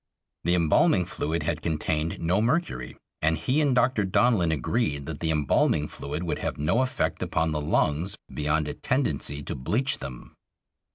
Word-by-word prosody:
The 85 +1 +3
embalming 85 -3 +3
fluid 80 +1 -2
had 80 0 -2
contained 80 0 -1
no 90 +5 +1
mercury, 115 - -1 0.2
and 80 +1 +2
he 130 - +1
and 140 -4 +2
Dr. 125 -3 +3
Donlin 95 -3 +3
agreed 75 - -1
that 80 0 -6
the 80 - -1
embalming 75 0 +2
fluid 75 +4 -5
would 85 - -2
have - - -3
no 85 - +2
effect 130 0 -1
upon 80 +1 0
the 75 -1 -1
lungs 80 +5 0 0.2
beyond 75 +1 0
a 75 - -3
tendency 80 - -1
to - - -4
bleach 110 - 0
them. 65 -3 -8
80 Hz, 165 wpm, -26 LUFS, 75-110 Hz, 0.2 s, The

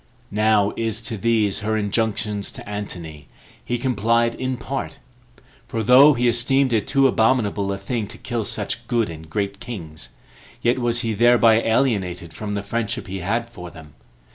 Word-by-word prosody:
Now 105 -1 +3
is 115 -1 -2
to 115 -1 -3
these 110 -1 +1
her 110 +1 -1
injunctions 105 -1 -1
to - - -9
Antony, 85 -8 -6 0.4
he 120 - -2
complied 115 -1 +1
in 130 +1 -3
part; 115 - -5 0.7
for 115 -1 -2
though 135 +6 +7
he 125 0 +1
esteemed 125 +2 +2
it 110 -3 +1
too 135 0 +3
abominable 110 -5 +1
a 100 - -2
thing 105 +2 -3
to - - -10
kill 120 -2 -3
such 110 +3 -4
good 115 -7 0
and 80 0 -10
great 100 +3 -3
kings, 80 - -8 0.5
yet 120 +2 +1
was 120 -1 0
he 115 -2 -1
thereby 115 0 +5
alienated 100 -9 0
from 105 +4 -5
the 100 0 -3
friendship 115 0 -3
he 95 +1 -5
had 115 +6 -1
for 90 -6 -9
them. 80 -3 -14
110 Hz, 165 wpm, -22 LUFS, 100-120 Hz, 0.7 s, though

